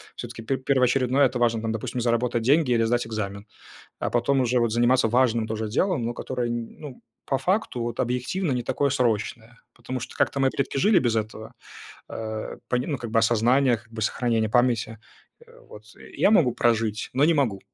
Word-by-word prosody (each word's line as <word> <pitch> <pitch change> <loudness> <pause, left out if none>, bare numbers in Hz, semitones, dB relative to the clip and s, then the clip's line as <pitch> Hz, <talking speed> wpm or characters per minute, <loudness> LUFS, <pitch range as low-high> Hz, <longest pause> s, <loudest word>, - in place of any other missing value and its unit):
всё-таки - - -8
пер 130 +4 -2
первоочередное 130 0 +2
это 125 - -5
важно, 115 -2 +1
там, 110 0 -2
допустим, 115 +3 -4
заработать 120 0 0
деньги 140 +3 +3
или 115 -1 +3
сдать 120 +1 0
экзамен. 100 -2 -5 0.5
А - - -2
потом 125 +3 +1
уже 125 0 +1
вот 115 -1 +1
заниматься 120 +1 +3
важным 115 -1 +2
тоже 110 0 -3
делом, 135 - 0
но 120 - -2
которое, 125 0 -3
н 120 -1 -5
ну, 145 -5 -9 0.2
по 135 - -1
факту, 185 - -1
вот, 120 0 -4
объективно 130 +7 -1
не 125 - -1
такое 140 +4 0
срочное, 120 -2 -1 0.2
потому 125 +2 -6
что - - -8
как-то - - +1
мои 135 -1 +3
предки 140 - -3
жили 205 +6 +4
без 120 -3 0
этого, 110 0 -4 0.6
э, 110 -1 -5
по - - +1
ним, 125 +5 -2
ну, - - 0
как 120 - -6
бы 115 - +2
осознаниях, 120 +1 +2
как 120 - -25
бы 110 - -6
сохранения 115 0 0
памяти. 115 -1 +1 0.7
Вот 105 - -12
и - - -13
я - - +6
могу 155 - +4
прожить, 115 -2 0
но 135 +3 +3
не 165 +2 +4
могу. 120 -10 0
120 Hz, 195 wpm, -25 LUFS, 115-130 Hz, 0.7 s, я